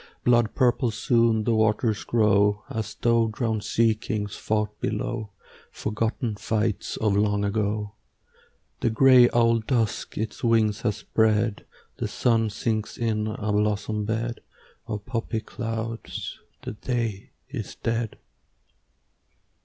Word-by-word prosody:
Blood 120 -2 +3
purple 125 -1 +3
soon 115 0 +2
the 115 - +1
waters 110 0 +1
grow, 105 -2 +3
As 110 -1 -4
though 115 -1 +3
drowned 110 -1 -2
sea 115 -1 +3
kings 105 -1 -4
fought 105 -1 -2
below 110 0 -2 0.4
Forgotten 110 +1 -2
fights 110 -1 -1
of 105 -2 +1
long 105 0 +2
ago. 105 0 -1 0.9
The - - +1
gray 125 +1 +7
owl 115 -1 +4
Dusk 115 -1 -1
its 110 0 -4
wings 110 -3 +2
has 105 -4 0
spread; 110 0 +1 0.3
The - - -2
sun 115 -2 +1
sinks 110 0 -2
in 110 -2 0
a 105 0 -2
blossom 105 0 0
bed 115 +2 -2 0.5
Of 105 -1 -4
poppy 115 -1 -2
clouds; 115 0 -5 0.2
the - - -4
day 115 -3 -3 0.2
is 120 -7 -6
dead. 115 -1 -2
110 Hz, 120 wpm, -25 LUFS, 105-115 Hz, 0.9 s, gray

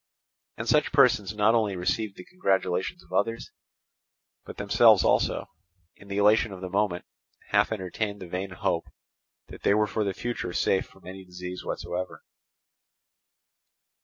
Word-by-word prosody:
And 115 - -5
such 150 +5 +3
persons 120 -8 +4
not 105 +2 +4
only 110 -4 +1
received 100 +3 -1
the 90 - -10
congratulations 95 - -1
of - - -16
others, 115 0 -1 0.9
but - - -10
themselves 105 +1 +5
also, - - +2 0.5
in 100 - -17
the 100 0 -4
elation 105 +2 +4
of 95 - -8
the 90 -1 -6
moment, 100 -3 0 0.4
half - - +3
entertained 100 +1 -3
the 95 - -8
vain 90 +3 -4
hope 90 - -2 0.6
that - - -11
they 100 - +3
were 105 0 +3
for 105 +1 -2
the 100 -2 -2
future 120 -7 -4
safe 95 - +1
from 95 - -21
any 95 +1 -9
disease 90 0 -8
whatsoever. 90 +1 -5
100 Hz, 150 wpm, -27 LUFS, 95-110 Hz, 0.9 s, themselves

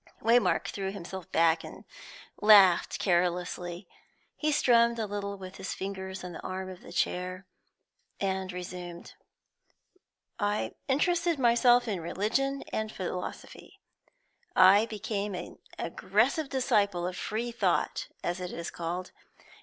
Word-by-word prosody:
Waymark 235 +2 +3
threw 195 -1 -3
himself 190 -2 -8
back 165 0 +3
and - - -10 0.6
laughed 200 -5 +6
carelessly. 175 0 -1 0.5
He 305 0 0
strummed 235 -4 +4
a 225 - -1
little 200 -1 -4
with 190 0 -9
his 190 - -4
fingers 190 -1 -5
on 180 - -6
the 165 - -8
arm 185 0 -5
of 180 - -11
the - - -12
chair, 185 +1 -2 0.7
and 190 -1 -1
resumed: 180 -1 -7 1.3
"I 205 0 -1
interested 335 +4 +2
myself 245 -1 +4
in 200 -5 -1
religion 250 +11 -1
and 220 0 -2
philosophy; 180 -2 -6 0.8
I 200 +4 +7
became 210 -2 -3
an 180 - -8 0.2
aggressive 315 -5 0
disciple 205 -9 +1
of 180 0 -3
free 225 +5 -3
thought, 235 - 0 0.2
as 175 +1 -2
it 180 -1 -5
is 170 - -5
called. 175 +2 -4
195 Hz, 125 wpm, -29 LUFS, 180-225 Hz, 1.3 s, I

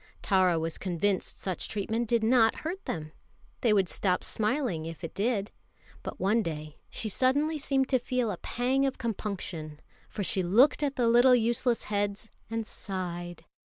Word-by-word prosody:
Tara 185 -3 +3
was 165 0 -3
convinced 185 +1 -1
such 185 -3 -2
treatment 220 +3 -1
did 230 0 +2
not 225 -1 +4
hurt 360 +5 -4
them. 155 -2 -4 0.5
They 235 - +3
would 195 -3 +3
stop 180 +1 0
smiling 215 - -1
if 165 +1 -8
it 165 - -5
did. 205 -1 0 0.5
But - - -7
one 210 +5 +3
day 155 -4 -5
she 220 - -4
suddenly 285 +8 +1
seemed 270 -1 +1
to 260 - +3
feel 245 -2 -1
a 185 - -4
pang 260 +7 0
of 265 - -3
compunction, 185 -9 -4 0.3
for 205 - -4
she 190 - +1
looked 220 +13 +4
at 285 -2 0
the 240 -2 +2
little 245 +2 +6
useless 235 +1 +1
heads 205 +1 -2 0.2
and 225 0 -2
sighed. 175 -4 -6
215 Hz, 165 wpm, -29 LUFS, 180-245 Hz, 0.5 s, little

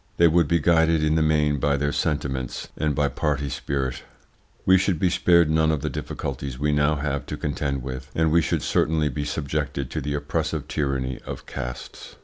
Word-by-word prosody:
They 85 - +6
would 85 -1 +3
be 85 - +3
guided 80 -1 +3
in 75 0 +2
the 80 - +2
main 75 -2 +2
by 70 +1 +2
their 70 +1 0
sentiments 65 -5 -2
and 75 -2 0
by 75 -2 +2
party 70 +1 -1
spirit. 65 -2 -3 0.6
We 95 - +6
should 95 -2 +1
be 90 0 +2
spared 85 -2 +4
none 80 0 +3
of 75 -3 -1
the - - -2
difficulties 70 -1 -5
we 75 +2 +1
now 75 +1 +2
have 70 -1 -3
to - - -4
contend 70 -2 -2
with, 65 0 -6
and 80 -1 +2
we 85 +1 +5
should 70 - -1
certainly 80 -1 +1
be 75 +3 -3
subjected 70 -2 -3
to 75 - -2
the 70 +1 -2
oppressive 75 +1 -2
tyranny 70 -4 -2
of - - -7
castes. 60 -1 -7
75 Hz, 195 wpm, -24 LUFS, 70-80 Hz, 0.6 s, They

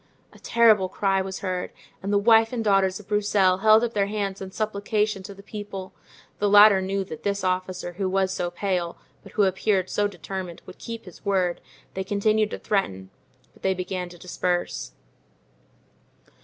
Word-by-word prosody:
A - - -17
terrible 220 -5 +4
cry 195 -1 +1
was 190 0 -5
heard, 185 -2 -2 0.3
and 195 - -3
the 205 - +4
wife 225 +2 +5
and 240 -3 -2
daughters 195 -2 +2
of 205 - -14
Broussel 205 -3 +2
held 220 +2 +6
up 235 -1 -1
their 200 -1 +1
hands 200 -2 -3
in 190 - -5
supplication 210 0 -1
to 200 +1 -9
the 200 - -14
people; 200 -3 -7 0.5
the 205 - +2
latter 205 -1 +8
knew 195 +1 -1
that 160 -5 -9
this 200 0 -2
officer, 185 -1 -2
who 190 +1 -2
was 190 0 +1
so 175 -2 -2
pale, 175 -1 -2 0.2
but - - -15
who 210 - +3
appeared 190 0 +1
so 205 0 +1
determined, 185 -1 -7
would 185 - -12
keep 230 -1 -7
his 180 - -13
word; 185 -3 0 0.3
they 190 - -3
continued 210 +2 +1
to - - -5
threaten, 95 - -2 0.4
but - - -23
they 190 0 +1
began 180 -1 -4
to 175 - -13
disperse. 175 - -2
195 Hz, 180 wpm, -25 LUFS, 185-210 Hz, 0.5 s, latter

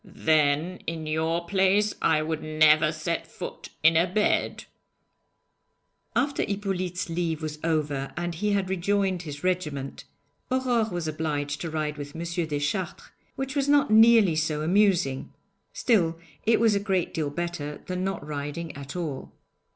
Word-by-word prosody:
'Then, 155 -1 +1
in 165 -1 -3
your 160 +2 -1
place, 195 +3 +2
I 155 -1 +3
would 160 0 -3
never 155 0 +4
set 165 +2 -3
foot - - -8
in 160 +1 +6
a 170 +3 +4
bed.' 210 +2 +1 1.5
After 275 +4 +1
Hippolyte's 190 -3 -2
leave 165 -2 -2
was 155 -1 -4
over, 145 -4 -1
and 175 0 -2
he 205 +5 0
had 195 -2 +1
rejoined 190 0 0
his 150 -3 -8
regiment, 150 -7 -2 0.4
Aurore 250 -4 +1
was 175 -2 -3
obliged 145 -2 -2
to 165 - -3
ride 155 -1 -3
with 145 +1 -7
M. 165 - -5 0.3
Deschartres, 150 +5 -3 0.2
which 270 +1 -4
was 280 0 +1
not 285 -5 +4
nearly 220 -5 +6
so 155 -1 0
amusing; 180 -6 +2 0.4
still, 170 -9 +2 0.3
it 230 - +5
was 225 -2 +4
a 200 - +2
great 190 -3 -1
deal 155 -3 -1
better 155 -2 -4
than 185 0 -3
not 195 -6 -3
riding 150 +2 -5
at 140 +1 -8
all. 155 -7 -4
170 Hz, 150 wpm, -26 LUFS, 155-195 Hz, 1.5 s, in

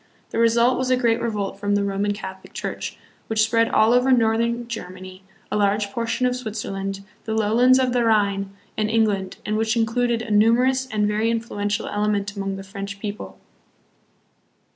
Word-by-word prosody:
The - - -2
result 235 +2 +3
was 255 0 -1
a 255 - +3
great 235 -2 +1
revolt 205 -4 -3
from 205 0 0
the 205 - +1
Roman 200 +1 0
Catholic 190 -2 -8
Church, - - -5 0.3
which 220 -1 +2
spread 230 +1 +2
all 220 +2 +4
over 250 +2 +3
northern 235 0 +2
Germany, 185 -4 -8 0.3
a - - +1
large 205 0 +1
portion 230 +3 -1
of 250 0 +1
Switzerland, 195 -4 -4 0.2
the 220 - -2
lowlands 230 +4 +4
of 255 -2 +1
the 245 -1 +2
Rhine, 200 -3 +1 0.2
and 215 -1 0
England, 210 -4 0
and 215 0 -1
which 220 +1 0
included 230 +1 +1
a 225 - -6
numerous 245 +5 +3
and 210 -3 0
very 215 +2 +1
influential 210 -3 -2
element 205 0 -1
among 195 -1 -3
the 195 - -7
French 200 0 -7
people. 210 0 -6
220 Hz, 170 wpm, -23 LUFS, 200-235 Hz, 0.3 s, all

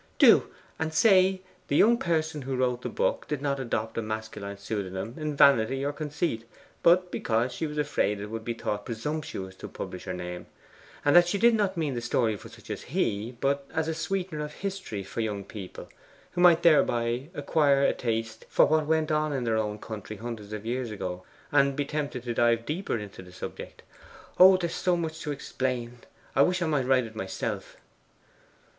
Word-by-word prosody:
'Do! - - +6 0.3
And 160 0 -2
say, 190 0 +5 0.2
the 140 - 0
young 230 +9 +6
person 160 -3 0
who 135 0 -3
wrote 125 -1 0
the - - -4
book - - -1
did 150 - -2
not 140 -1 -1
adopt 115 -3 -2
a - - 0
masculine 110 -2 -5
pseudonym 100 +1 -4
in 155 -2 -3
vanity 135 -1 +4
or 145 - -1
conceit, 150 -5 -2 0.4
but 180 +1 +4
because 115 +3 0
she 160 +5 -3
was 150 0 -7
afraid 145 -8 0
it 105 +1 -6
would 115 0 -4
be 115 +1 -3
thought 105 -2 -3
presumptuous 115 -5 -4
to - - -7
publish 90 - -7
her 90 - -3
name, 90 0 -6 0.6
and 145 - +4
that 175 0 +8
she 200 - 0
did 235 +3 +5
not 200 -4 +1
mean 155 -4 0
the 120 - -3
story 115 -2 +1
for - - -11
such - - -11
as - - -4
he, 110 +4 -2
but 140 0 0
as 160 0 0
a 160 - 0
sweetener 175 -1 -2
of 150 0 -6
history 190 - -5
for 105 - -4
young 105 -3 -2
people, 100 -2 -9 0.4
who 175 - -2
might 170 -1 +6
thereby 120 -4 +3
acquire 140 -1 +3
a - - +4
taste 115 -1 -3
for - - +5
what 155 -1 +2
went 160 0 +1
on 155 0 +1
in 135 -3 -1
their 115 -2 +1
own 105 -1 -1
country 110 -1 -7
hundreds 110 -2 -7
of 105 0 -6
years 125 +1 -2
ago, 95 -3 -5 0.3
and 140 -1 +4
be 145 0 -1
tempted 145 -4 -3
to 120 -1 -2
dive 115 0 +2
deeper 160 -2 -2
into 105 -3 -8
the 90 -1 -13
subject. 90 - -8 0.6
Oh, 185 +1 +9
there 175 -2 -1
is - - -4
so 180 -1 +1
much 160 -1 -3
to 150 -2 -4
explain; 125 -3 -3 0.4
I 135 - +5
wish 180 +5 +3
I - - +1
might 145 -5 0
write 130 -4 +2
myself! 95 -3 -4
135 Hz, 200 wpm, -28 LUFS, 110-155 Hz, 0.6 s, Oh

